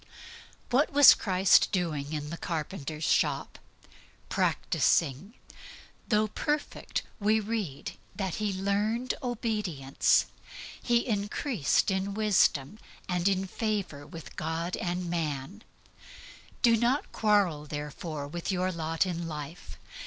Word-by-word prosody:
What 275 Hz, +5 st, +3 dB
was 285 Hz, -1 st, +9 dB
Christ 190 Hz, -2 st, +4 dB
doing 155 Hz, -6 st, -1 dB
in 150 Hz, -1 st, -4 dB
the 170 Hz, -, -5 dB
carpenter's 155 Hz, -2 st, -4 dB
shop? -, -, +1 dB, 0.7 s
Practising. 165 Hz, -, +1 dB, 0.7 s
Though 215 Hz, -2 st, +2 dB
perfect, 295 Hz, +7 st, -2 dB, 0.2 s
we 215 Hz, +1 st, +3 dB
read 205 Hz, -10 st, -3 dB, 0.2 s
that 190 Hz, -4 st, -3 dB
He 210 Hz, -1 st, 0 dB
learned 205 Hz, +6 st, 0 dB
obedience, 210 Hz, -, +1 dB, 0.6 s
and 220 Hz, -4 st, +1 dB
grew 245 Hz, -, -3 dB, 0.3 s
in 195 Hz, 0 st, -1 dB
wisdom 205 Hz, -5 st, +2 dB, 0.3 s
and 180 Hz, 0 st, 0 dB
in 195 Hz, -1 st, +1 dB
favor 195 Hz, -9 st, -3 dB
with 165 Hz, -2 st, -10 dB
God. 165 Hz, +3 st, -2 dB, 1.9 s
Do 235 Hz, -2 st, +6 dB
not 245 Hz, +5 st, +1 dB
quarrel, 195 Hz, -9 st, +2 dB
therefore, 150 Hz, 0 st, -5 dB
with 170 Hz, +5 st, -4 dB
your 185 Hz, 0 st, 0 dB
lot 165 Hz, 0 st, 0 dB
in 170 Hz, -2 st, -3 dB
life. 150 Hz, +1 st, -8 dB
190 Hz, 105 wpm, -29 LUFS, 160-215 Hz, 1.9 s, was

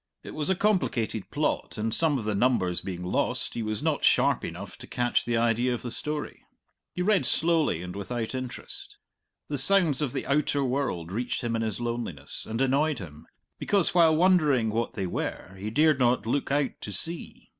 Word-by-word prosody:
It -, -, -8 dB
was 150 Hz, +1 st, -2 dB
a 190 Hz, -, +3 dB
complicated 175 Hz, -, 0 dB
plot, -, -, -1 dB
and, 110 Hz, +1 st, -1 dB
some 155 Hz, +1 st, +3 dB
of 120 Hz, -, -4 dB
the 105 Hz, -, 0 dB
numbers 100 Hz, -6 st, +1 dB
being 90 Hz, -2 st, -5 dB
lost, 90 Hz, -, -1 dB
he 115 Hz, -, -3 dB
was 110 Hz, -1 st, -3 dB
not -, -, 0 dB
sharp -, -, +3 dB
enough -, -, -7 dB
to -, -, -10 dB
catch 120 Hz, 0 st, 0 dB
the 120 Hz, -1 st, 0 dB
idea 120 Hz, +2 st, +2 dB
of -, -, -8 dB
the 120 Hz, -, -4 dB
story. 150 Hz, +3 st, -4 dB, 0.5 s
He 180 Hz, -, -3 dB
read 205 Hz, -2 st, +3 dB
slowly 160 Hz, -, +3 dB
and 90 Hz, +1 st, -7 dB
without 115 Hz, +4 st, -4 dB
interest. 130 Hz, -1 st, -6 dB, 0.5 s
The 145 Hz, -2 st, -2 dB
sounds 160 Hz, -2 st, +4 dB
of 145 Hz, -5 st, -1 dB
the -, -, -4 dB
outer 140 Hz, 0 st, +1 dB
world 125 Hz, -11 st, -2 dB
reached 120 Hz, +5 st, -2 dB
him 115 Hz, -1 st, -1 dB
in 115 Hz, -, -1 dB
his 110 Hz, -1 st, -2 dB
loneliness 115 Hz, -, -4 dB
and 115 Hz, +3 st, -3 dB
annoyed 140 Hz, +3 st, +2 dB
him, 80 Hz, -6 st, -10 dB, 0.3 s
because, 200 Hz, -4 st, +3 dB
while 165 Hz, -3 st, +5 dB
wondering 155 Hz, -, +3 dB
what 115 Hz, +2 st, -1 dB
they 95 Hz, -, -3 dB
were, 90 Hz, +1 st, -4 dB
he 105 Hz, +2 st, -4 dB
dared 150 Hz, +4 st, +3 dB
not 120 Hz, -4 st, +2 dB
look 135 Hz, +5 st, -1 dB
out 145 Hz, -1 st, +1 dB
to 105 Hz, -, -5 dB
see. 165 Hz, -, -5 dB
125 Hz, 195 wpm, -27 LUFS, 110-150 Hz, 0.5 s, while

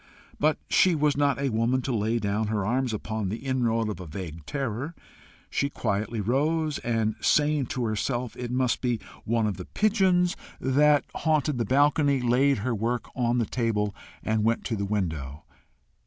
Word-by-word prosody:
But 155 Hz, +1 st, +3 dB
she 185 Hz, -2 st, +4 dB
was 150 Hz, -1 st, +2 dB
not 145 Hz, -1 st, +2 dB
a 140 Hz, 0 st, 0 dB
woman 115 Hz, +4 st, +1 dB
to 130 Hz, -2 st, -1 dB
lay 110 Hz, +2 st, +1 dB
down 105 Hz, 0 st, -1 dB
her 105 Hz, -2 st, -1 dB
arms 125 Hz, +3 st, 0 dB
upon 110 Hz, -2 st, -3 dB
the 110 Hz, -, -3 dB
inroad 115 Hz, -4 st, +1 dB
of 105 Hz, -4 st, -4 dB
a 90 Hz, -, -7 dB
vague 80 Hz, -1 st, -7 dB
terror. 135 Hz, +3 st, -3 dB, 0.6 s
She 140 Hz, -, 0 dB
quietly 110 Hz, -2 st, -2 dB
rose, 150 Hz, +8 st, 0 dB
and, 115 Hz, -2 st, 0 dB
saying 150 Hz, -3 st, +2 dB
to 125 Hz, -1 st, -2 dB
herself 120 Hz, +2 st, -2 dB
it 120 Hz, -1 st, -5 dB
must 125 Hz, -1 st, 0 dB
be 120 Hz, -3 st, 0 dB, 0.3 s
one 115 Hz, 0 st, +1 dB
of 105 Hz, -3 st, -1 dB
the 90 Hz, -, -7 dB
pigeons 190 Hz, -4 st, +2 dB, 0.2 s
that 145 Hz, +2 st, +3 dB
haunted 155 Hz, -4 st, +1 dB
the 115 Hz, -, +1 dB
balcony, 140 Hz, +2 st, +3 dB
laid 130 Hz, +3 st, +3 dB
her 125 Hz, -, +1 dB
work 115 Hz, +3 st, -2 dB
on 120 Hz, -1 st, +1 dB
the 115 Hz, -, +2 dB
table, 105 Hz, -3 st, -1 dB, 0.3 s
and 110 Hz, -1 st, 0 dB
went 115 Hz, +1 st, +1 dB
to 115 Hz, -, -2 dB
the 100 Hz, -1 st, -2 dB
window. 80 Hz, -9 st, -3 dB
120 Hz, 175 wpm, -27 LUFS, 110-140 Hz, 0.6 s, she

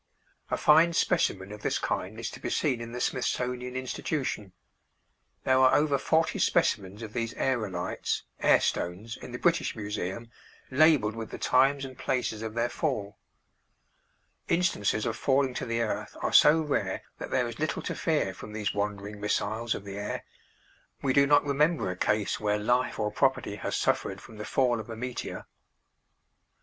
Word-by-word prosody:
A -, -, 0 dB
fine 160 Hz, +3 st, +5 dB
specimen 100 Hz, -, +1 dB
of 105 Hz, 0 st, -8 dB
this -, -, 0 dB
kind 105 Hz, +5 st, -3 dB
is 115 Hz, 0 st, -4 dB
to -, -, -9 dB
be -, -, -4 dB
seen 130 Hz, -6 st, 0 dB
in 115 Hz, 0 st, -6 dB
the 125 Hz, -, -5 dB
Smithsonian 125 Hz, 0 st, -1 dB
Institution. 130 Hz, -4 st, -3 dB, 0.9 s
There 130 Hz, 0 st, +3 dB
are 130 Hz, 0 st, +6 dB
over 145 Hz, -2 st, +3 dB
forty 160 Hz, +4 st, +1 dB
specimens 100 Hz, +3 st, +1 dB
of 110 Hz, -1 st, -8 dB
these 115 Hz, -1 st, -2 dB
aërolites 105 Hz, -9 st, -1 dB, 0.2 s
(air -, -, +5 dB
stones) 100 Hz, +7 st, -2 dB
in -, -, -8 dB
the 120 Hz, -, -4 dB
British 170 Hz, +5 st, +1 dB
Museum, 105 Hz, +1 st, -4 dB, 0.4 s
labeled 135 Hz, -6 st, +4 dB
with 115 Hz, -1 st, -6 dB
the -, -, -6 dB
times 135 Hz, +2 st, +3 dB
and 130 Hz, -1 st, -9 dB
places 125 Hz, -4 st, -2 dB
of 110 Hz, 0 st, -5 dB
their 115 Hz, +1 st, +1 dB
fall. 120 Hz, -6 st, -3 dB, 1.3 s
Instances 170 Hz, -, +1 dB
of 110 Hz, -1 st, -2 dB
falling 135 Hz, 0 st, +2 dB
to 125 Hz, -, -4 dB
the 115 Hz, 0 st, 0 dB
earth 115 Hz, -, -3 dB
are -, -, 0 dB
so 160 Hz, +2 st, +7 dB
rare 150 Hz, -2 st, -1 dB, 0.2 s
that -, -, -5 dB
there -, -, +1 dB
is -, -, -8 dB
little -, -, -1 dB
to -, -, -3 dB
fear -, -, 0 dB
from 105 Hz, -, -10 dB
these 105 Hz, -1 st, -2 dB
wandering 105 Hz, 0 st, -3 dB
missiles 110 Hz, +2 st, -1 dB
of -, -, -7 dB
the 100 Hz, 0 st, -6 dB
air. 105 Hz, -, -4 dB, 0.8 s
We 135 Hz, -2 st, +2 dB
do 140 Hz, +1 st, +5 dB
not 145 Hz, 0 st, +5 dB
remember 145 Hz, -, +2 dB
a -, -, -5 dB
case 105 Hz, +2 st, 0 dB
where 105 Hz, -1 st, +1 dB
life 120 Hz, +4 st, +1 dB
or 105 Hz, -1 st, -1 dB
property 130 Hz, -3 st, +1 dB
has -, -, -2 dB
suffered -, -, 0 dB
from 110 Hz, -, -13 dB
the 105 Hz, -, -6 dB
fall 125 Hz, -3 st, +2 dB
of 110 Hz, -, -8 dB
a 115 Hz, -, -5 dB
meteor. 125 Hz, +2 st, -5 dB
115 Hz, 175 wpm, -28 LUFS, 105-135 Hz, 1.3 s, so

